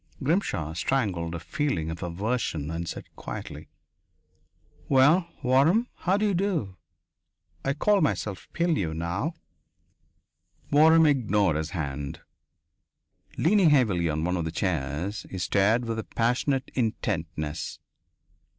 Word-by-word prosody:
Grimshaw 135 Hz, -, 0 dB
strangled 85 Hz, -4 st, -1 dB
a -, -, -4 dB
feeling 90 Hz, -, -2 dB
of 80 Hz, -, -7 dB
aversion 90 Hz, -, -2 dB
and 85 Hz, 0 st, -4 dB
said -, -, -6 dB
quietly: -, -, -7 dB, 1.2 s
"Well, 150 Hz, +7 st, +5 dB, 0.2 s
Waram. 150 Hz, -, +3 dB
How 185 Hz, +3 st, 0 dB
d'you 205 Hz, -1 st, +1 dB
do? 170 Hz, -, -1 dB, 0.9 s
I 135 Hz, -, +1 dB
call 205 Hz, +7 st, +2 dB
myself 105 Hz, -, -1 dB
Pilleux 160 Hz, -, 0 dB
now." 90 Hz, -, -2 dB, 1.4 s
Waram 160 Hz, +2 st, +6 dB
ignored 105 Hz, -, +2 dB
his 80 Hz, +1 st, -2 dB
hand. 70 Hz, -5 st, -4 dB, 1.2 s
Leaning 185 Hz, +1 st, +4 dB
heavily 105 Hz, -, +3 dB
on 80 Hz, +1 st, -1 dB
one 90 Hz, +2 st, 0 dB
of 85 Hz, -, -2 dB
the 80 Hz, -, -3 dB
chairs, 85 Hz, +2 st, -2 dB
he 95 Hz, -, -6 dB
stared 105 Hz, +6 st, +2 dB
with 115 Hz, -1 st, -2 dB
a -, -, -3 dB
passionate 130 Hz, +3 st, 0 dB
intentness. 85 Hz, -, -2 dB
105 Hz, 115 wpm, -27 LUFS, -, 1.4 s, Waram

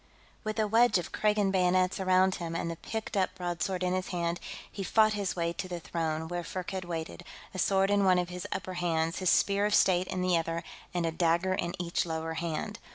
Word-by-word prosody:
With 215 Hz, -1 st, -3 dB
a 215 Hz, -1 st, +2 dB
wedge 230 Hz, +1 st, +5 dB
of 175 Hz, -, -4 dB
Kragan 210 Hz, -2 st, +2 dB
bayonets 185 Hz, 0 st, +2 dB
around 185 Hz, 0 st, +4 dB
him 165 Hz, -1 st, -4 dB
and 170 Hz, 0 st, -2 dB
the -, -, -4 dB
picked 220 Hz, +7 st, -5 dB
up 185 Hz, -1 st, +1 dB
broadsword 180 Hz, +1 st, -2 dB
in 180 Hz, 0 st, +1 dB
his 185 Hz, 0 st, -1 dB
hand, 170 Hz, -1 st, -2 dB, 0.3 s
he 200 Hz, -, -6 dB
fought 215 Hz, +2 st, +4 dB
his 200 Hz, -2 st, -2 dB
way 170 Hz, -1 st, -1 dB
to 185 Hz, -, -5 dB
the 175 Hz, -1 st, -4 dB
throne, 160 Hz, -1 st, -2 dB
where 175 Hz, +1 st, -3 dB
Firkked 185 Hz, +1 st, -4 dB
waited, 170 Hz, 0 st, -5 dB, 0.3 s
a 185 Hz, -, -5 dB
sword 195 Hz, +2 st, +3 dB
in 205 Hz, -1 st, +3 dB
one 185 Hz, -1 st, +5 dB
of 180 Hz, -1 st, 0 dB
his 180 Hz, 0 st, -6 dB
upper 185 Hz, 0 st, -3 dB
hands, 165 Hz, -2 st, 0 dB
his 185 Hz, -2 st, +2 dB
Spear 200 Hz, +3 st, +3 dB
of 210 Hz, -, +2 dB
State 185 Hz, -1 st, +4 dB
in 185 Hz, 0 st, -2 dB
the 180 Hz, -1 st, +3 dB
other, 165 Hz, +1 st, -3 dB, 0.3 s
and 175 Hz, -2 st, -1 dB
a 165 Hz, -, 0 dB
dagger 170 Hz, +3 st, +2 dB
in 175 Hz, -2 st, -2 dB
each 175 Hz, -1 st, 0 dB
lower 160 Hz, 0 st, -3 dB
hand. 165 Hz, -1 st, -3 dB
180 Hz, 220 wpm, -30 LUFS, 170-190 Hz, 0.3 s, wedge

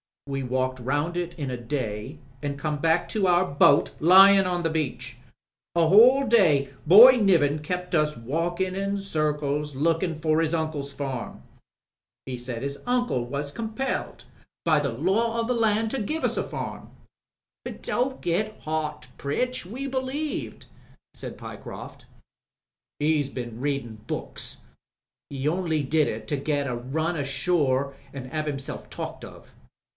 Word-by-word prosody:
We 135 Hz, -1 st, -3 dB
walked 130 Hz, 0 st, -1 dB
round 145 Hz, +7 st, -1 dB
it 175 Hz, 0 st, -4 dB
in 140 Hz, -4 st, -3 dB
a 125 Hz, -, -3 dB
day, 120 Hz, +1 st, -4 dB, 0.2 s
an* 145 Hz, -1 st, -3 dB
come 150 Hz, +1 st, -2 dB
back 165 Hz, +3 st, +2 dB
to 205 Hz, -3 st, +1 dB
our 175 Hz, +1 st, +4 dB
boat 145 Hz, -2 st, +4 dB
lyin* 195 Hz, +3 st, +7 dB
on 175 Hz, -1 st, -1 dB
the 165 Hz, -, +1 dB
beach. 130 Hz, -6 st, -3 dB, 0.6 s
A 170 Hz, -1 st, +4 dB
whole 250 Hz, +8 st, +7 dB
day 155 Hz, -, +4 dB, 0.2 s
Boy 240 Hz, +9 st, +10 dB
Niven 165 Hz, -9 st, +3 dB
kept 180 Hz, +4 st, -4 dB
us 150 Hz, -2 st, +2 dB
walkin* 170 Hz, +9 st, -2 dB
in 195 Hz, +1 st, -2 dB
circles 150 Hz, -5 st, -1 dB
lookin* 165 Hz, +4 st, +1 dB
for 155 Hz, 0 st, +1 dB
*is 165 Hz, 0 st, +1 dB
uncle's 155 Hz, -3 st, -3 dB
farm 135 Hz, -4 st, -5 dB
I -, -, -29 dB, 0.8 s
He 125 Hz, -, -3 dB
said 120 Hz, 0 st, -5 dB
his 140 Hz, 0 st, -4 dB
uncle 245 Hz, -, 0 dB
was 140 Hz, +3 st, -4 dB
compelled 230 Hz, -, -4 dB, 0.4 s
by 155 Hz, -3 st, +4 dB
the 145 Hz, -1 st, -1 dB
law 205 Hz, -, 0 dB
of 230 Hz, -, -1 dB
the 250 Hz, -, +1 dB
land 220 Hz, -1 st, +1 dB
to 270 Hz, -, -2 dB
give 310 Hz, +10 st, -3 dB
us -, -, 0 dB
a -, -, +1 dB
farmi" -, -, -6 dB, 0.9 s
"Don't 260 Hz, +2 st, -1 dB
get 205 Hz, +5 st, -1 dB
hot, 150 Hz, -4 st, -3 dB
Pritch. 250 Hz, -, -2 dB
We 245 Hz, +9 st, -6 dB
believed," 270 Hz, +3 st, -3 dB, 0.5 s
said -, -, -8 dB
Pye -, -, -8 dB
croft. -, -, -10 dB, 0.9 s
"He'd 150 Hz, -2 st, +1 dB
been 120 Hz, -3 st, -5 dB
readin' 135 Hz, -5 st, -3 dB
books. -, -, -4 dB, 0.7 s
He 140 Hz, 0 st, -3 dB
only 160 Hz, -2 st, 0 dB
did 150 Hz, +2 st, +2 dB
it -, -, -5 dB
to 145 Hz, -, 0 dB
get 145 Hz, 0 st, -1 dB
a 125 Hz, -, -2 dB
run 155 Hz, +8 st, -2 dB
ashore 140 Hz, -1 st, 0 dB, 0.2 s
an' 135 Hz, -2 st, -6 dB
have 155 Hz, +2 st, -3 dB
himself 135 Hz, -2 st, -5 dB
talked -, -, -6 dB
of. -, -, -14 dB
155 Hz, 155 wpm, -25 LUFS, 140-190 Hz, 0.9 s, Boy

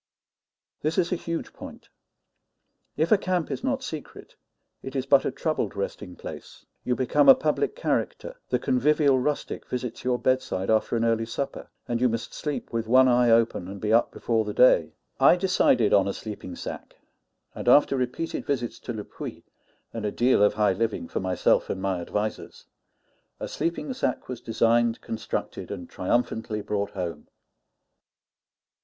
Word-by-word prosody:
This 155 Hz, +2 st, -1 dB
is 175 Hz, -2 st, +1 dB
a -, -, +2 dB
huge 170 Hz, -1 st, -5 dB
point. -, -, -11 dB, 1.1 s
If 160 Hz, +3 st, +1 dB
a 215 Hz, -, +6 dB
camp 180 Hz, -3 st, -1 dB
is -, -, -4 dB
not 270 Hz, 0 st, -1 dB
secret, 155 Hz, -3 st, -8 dB, 0.5 s
it 135 Hz, +1 st, -8 dB
is 135 Hz, -1 st, -1 dB
but 135 Hz, 0 st, +4 dB
a -, -, 0 dB
troubled 135 Hz, -, -2 dB
resting 100 Hz, -2 st, -5 dB
place; -, -, -10 dB, 0.2 s
you 125 Hz, -, 0 dB
become 140 Hz, +2 st, +3 dB
a 135 Hz, -, +11 dB
public 155 Hz, -, 0 dB
character; -, -, -2 dB
the -, -, +2 dB
convivial 140 Hz, +1 st, +3 dB
rustic 145 Hz, +3 st, -3 dB
visits 125 Hz, -2 st, -4 dB
your 125 Hz, -1 st, +1 dB
bedside 125 Hz, -7 st, 0 dB
after 110 Hz, +2 st, +2 dB
an 115 Hz, 0 st, +1 dB
early 115 Hz, 0 st, +1 dB
supper; 135 Hz, +4 st, -5 dB, 0.2 s
and 120 Hz, -1 st, -1 dB
you 125 Hz, -, +4 dB
must 115 Hz, 0 st, -4 dB
sleep 150 Hz, -5 st, -4 dB
with 115 Hz, -1 st, -2 dB
one 130 Hz, +2 st, +6 dB
eye 125 Hz, -1 st, +4 dB
open, 115 Hz, -5 st, +2 dB
and 100 Hz, +1 st, -7 dB
be 105 Hz, +2 st, 0 dB
up 115 Hz, -, +4 dB
before 115 Hz, -2 st, 0 dB
the 105 Hz, -1 st, -5 dB
day. 125 Hz, -, +5 dB, 0.3 s
I -, -, +7 dB
decided 175 Hz, -, +3 dB
on 100 Hz, -1 st, +5 dB
a 100 Hz, -, -1 dB
sleeping 105 Hz, -4 st, -7 dB
sack; -, -, -8 dB, 0.6 s
and -, -, -7 dB
after 145 Hz, -1 st, +5 dB
repeated 130 Hz, +6 st, -2 dB
visits 125 Hz, -5 st, -2 dB
to 120 Hz, -, -6 dB
Le 105 Hz, -2 st, -5 dB
Puy, -, -, -8 dB, 0.5 s
and 115 Hz, -, -5 dB
a 105 Hz, -, -1 dB
deal 120 Hz, -1 st, +3 dB
of 105 Hz, -, +4 dB
high 105 Hz, -2 st, +3 dB
living 110 Hz, -3 st, -2 dB
for -, -, -2 dB
myself 95 Hz, -1 st, +1 dB
and 95 Hz, -, -2 dB
my 95 Hz, -2 st, -1 dB
advisers, 105 Hz, +5 st, -4 dB, 0.7 s
a -, -, -4 dB
sleeping 170 Hz, +10 st, -3 dB
sack 255 Hz, -, -2 dB
was 125 Hz, -2 st, -6 dB
designed, 115 Hz, +1 st, +2 dB
constructed, 110 Hz, -1 st, -4 dB
and 90 Hz, -4 st, -7 dB
triumphantly 110 Hz, +1 st, -1 dB
brought 100 Hz, 0 st, -2 dB
home. 85 Hz, -5 st, -5 dB
120 Hz, 170 wpm, -26 LUFS, 105-140 Hz, 1.1 s, a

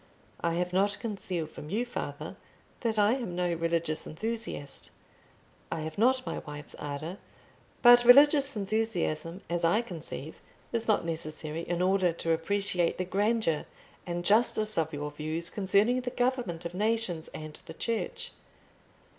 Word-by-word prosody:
I 170 Hz, 0 st, 0 dB
have 180 Hz, +1 st, -1 dB
not 200 Hz, +2 st, +2 dB
concealed 185 Hz, -7 st, -3 dB
from 150 Hz, -, -9 dB
you, 220 Hz, +7 st, 0 dB
father, 245 Hz, -, -5 dB, 0.4 s
that 225 Hz, -2 st, 0 dB
I 210 Hz, +1 st, +5 dB
am 235 Hz, -9 st, -3 dB
no 175 Hz, -1 st, 0 dB
religious 165 Hz, -1 st, 0 dB
enthusiast; 220 Hz, -5 st, -5 dB, 0.8 s
I 165 Hz, -, -2 dB
have 155 Hz, +3 st, -5 dB
not 255 Hz, +3 st, +3 dB
my -, -, -3 dB
wife's 145 Hz, -1 st, -8 dB
ardour; 150 Hz, +6 st, -5 dB, 0.6 s
but 240 Hz, 0 st, +9 dB
religious 280 Hz, +1 st, +7 dB
enthusiasm, 195 Hz, -5 st, -1 dB
as 170 Hz, 0 st, -2 dB
I 205 Hz, +8 st, +3 dB
conceive, 160 Hz, -, -6 dB, 0.3 s
is 230 Hz, -1 st, -1 dB
not 215 Hz, -5 st, +2 dB
necessary 155 Hz, -1 st, -3 dB
in 175 Hz, 0 st, 0 dB
order 185 Hz, -1 st, +3 dB
to 165 Hz, 0 st, -2 dB
appreciate 180 Hz, +1 st, +1 dB
the 185 Hz, -, -1 dB
grandeur 200 Hz, -3 st, +1 dB, 0.4 s
and 175 Hz, 0 st, -3 dB
justice 215 Hz, 0 st, +3 dB
of 160 Hz, -1 st, 0 dB
your 150 Hz, -1 st, -4 dB
views 155 Hz, +3 st, -2 dB
concerning 205 Hz, +5 st, +2 dB
the 250 Hz, -, -3 dB
government 245 Hz, -9 st, -1 dB
of 170 Hz, -, -4 dB
nations 210 Hz, -4 st, 0 dB
and 155 Hz, -1 st, -8 dB
the 160 Hz, -, -7 dB
Church. 230 Hz, +4 st, -2 dB
180 Hz, 145 wpm, -29 LUFS, 165-225 Hz, 0.8 s, but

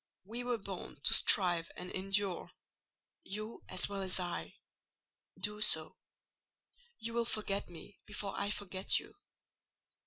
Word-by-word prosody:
We 230 Hz, +6 st, -7 dB
were 245 Hz, -1 st, -2 dB
born 195 Hz, -7 st, -9 dB
to -, -, +3 dB
strive 175 Hz, -4 st, +5 dB
and 180 Hz, 0 st, -8 dB
endure—you 195 Hz, +2 st, -5 dB
as -, -, +2 dB
well 200 Hz, -1 st, -6 dB
as 190 Hz, -1 st, -1 dB
I: 175 Hz, -1 st, -6 dB, 0.8 s
do 210 Hz, 0 st, -2 dB
so. -, -, +7 dB, 1.0 s
You 230 Hz, +1 st, -6 dB
will 235 Hz, 0 st, 0 dB
forget 205 Hz, -4 st, -3 dB
me 175 Hz, +3 st, -13 dB
before 200 Hz, -1 st, -5 dB
I 200 Hz, 0 st, -3 dB
forget 190 Hz, -2 st, +1 dB
you." -, -, -8 dB
200 Hz, 125 wpm, -33 LUFS, 185-210 Hz, 1.0 s, so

